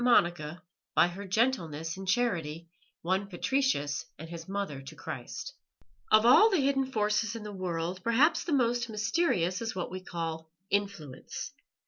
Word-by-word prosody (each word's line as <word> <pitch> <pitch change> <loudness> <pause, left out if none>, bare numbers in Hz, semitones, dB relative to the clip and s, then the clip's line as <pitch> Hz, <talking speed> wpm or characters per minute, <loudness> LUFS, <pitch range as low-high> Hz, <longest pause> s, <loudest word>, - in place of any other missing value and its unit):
MONICA 175 -8 +2 0.3
BY - - +6
HER 195 +3 -7
GENTLENESS 175 - 0
AND 190 0 -8
CHARITY 170 -8 0 0.4
WON 190 +3 0
PATRICIUS 195 - 0
AND 160 +2 -9
HIS 170 +1 -8
MOTHER 195 -9 -3
TO 135 +3 -10
CHRIST 165 - -6 0.6
Of 215 +1 +6
all 340 - +8
the 385 - +2
hidden 270 -1 +1
forces 210 0 +1
in 225 - -6
the 210 - -6
world 180 -1 -3
perhaps 260 +8 +4
the 345 - -4
most 240 -3 +2
mysterious 215 - +1
is 225 -2 -3
what 180 -2 -3
we 185 - -4
call 165 -3 -4 0.2
"influence." 195 -10 -3
195 Hz, 150 wpm, -30 LUFS, 165-235 Hz, 0.6 s, all